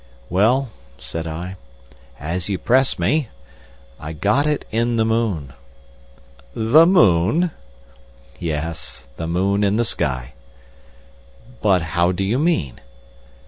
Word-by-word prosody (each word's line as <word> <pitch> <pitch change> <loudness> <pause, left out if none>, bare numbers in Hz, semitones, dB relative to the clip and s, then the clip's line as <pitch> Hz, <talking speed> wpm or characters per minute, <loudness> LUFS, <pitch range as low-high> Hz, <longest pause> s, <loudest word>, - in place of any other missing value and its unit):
"Well," 115 +7 +2 0.3
said 80 0 -5
I, 90 +4 -6 0.6
"as 85 +6 -3
you 100 - 0
press 130 +7 +2
me—I 70 - -5
got 105 - +1
it 150 -1 -1
in 115 +2 0
the 110 -1 +2
moon." 105 - -1 1.0
"The 135 +9 +5
moon?" 160 - +4 0.9
"Yes, 80 -3 -4
the 80 - -4
moon 95 +4 +1
in 100 0 +2
the 120 +2 +1
sky." 65 - -2 1.3
"But 95 -5 +3
how 85 +1 +3
do 90 +2 -2
you 110 +7 0
mean?" 150 - 0
95 Hz, 110 wpm, -21 LUFS, 80-120 Hz, 1.3 s, The